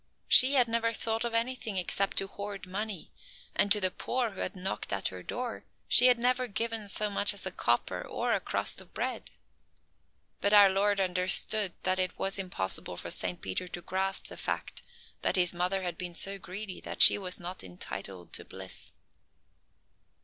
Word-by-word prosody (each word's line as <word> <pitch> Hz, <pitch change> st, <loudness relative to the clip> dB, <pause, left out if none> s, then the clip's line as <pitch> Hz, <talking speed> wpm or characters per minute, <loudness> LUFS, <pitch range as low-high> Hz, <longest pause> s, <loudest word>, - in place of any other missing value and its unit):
She 265 Hz, +3 st, +8 dB
had 250 Hz, -3 st, +5 dB
never 230 Hz, 0 st, 0 dB
thought 225 Hz, +1 st, -2 dB
of 235 Hz, -1 st, -3 dB
anything 230 Hz, -3 st, -1 dB
except 195 Hz, +2 st, 0 dB
to 195 Hz, -, +2 dB
hoard 200 Hz, 0 st, -8 dB
money, 195 Hz, -1 st, -5 dB, 0.4 s
and 200 Hz, -, +5 dB
to 210 Hz, -, +6 dB
the 185 Hz, -2 st, +1 dB
poor 245 Hz, +2 st, -2 dB
who 195 Hz, -, -11 dB
had -, -, -3 dB
knocked 180 Hz, -, -4 dB
at 100 Hz, -1 st, -1 dB
her 90 Hz, -1 st, -9 dB
door 240 Hz, -, -5 dB, 0.2 s
she 245 Hz, -, +7 dB
had 250 Hz, -1 st, +5 dB
never 250 Hz, +1 st, +1 dB
given 225 Hz, 0 st, -3 dB
so 210 Hz, +1 st, +1 dB
much 200 Hz, 0 st, +4 dB
as 195 Hz, -, -6 dB
a 190 Hz, -, -3 dB
copper 120 Hz, -6 st, 0 dB
or -, -, -1 dB
a -, -, +1 dB
crust -, -, -3 dB
of -, -, -16 dB
bread. -, -, -3 dB, 1.1 s
But 200 Hz, +2 st, +1 dB
our 205 Hz, -1 st, +8 dB
Lord 200 Hz, +1 st, +1 dB
understood 185 Hz, +2 st, +2 dB
that 185 Hz, 0 st, 0 dB
it 185 Hz, -1 st, -2 dB
was 195 Hz, +1 st, -2 dB
impossible 180 Hz, -, -3 dB
for -, -, -5 dB
Saint 90 Hz, -1 st, -2 dB
Peter 95 Hz, -, -3 dB
to 175 Hz, 0 st, -7 dB
grasp 190 Hz, +1 st, -1 dB
the -, -, -8 dB
fact -, -, -4 dB, 0.4 s
that -, -, +1 dB
his 180 Hz, -1 st, +3 dB
mother 180 Hz, +2 st, -1 dB
had 175 Hz, -1 st, -4 dB
been 175 Hz, -2 st, -5 dB
so 195 Hz, +2 st, 0 dB
greedy 190 Hz, +1 st, -7 dB
that -, -, +4 dB
she -, -, +9 dB
was 185 Hz, -2 st, -4 dB
not 180 Hz, +2 st, -6 dB
entitled 90 Hz, 0 st, -5 dB
to -, -, -1 dB
bliss. 95 Hz, 0 st, -9 dB
195 Hz, 185 wpm, -29 LUFS, 180-215 Hz, 1.1 s, she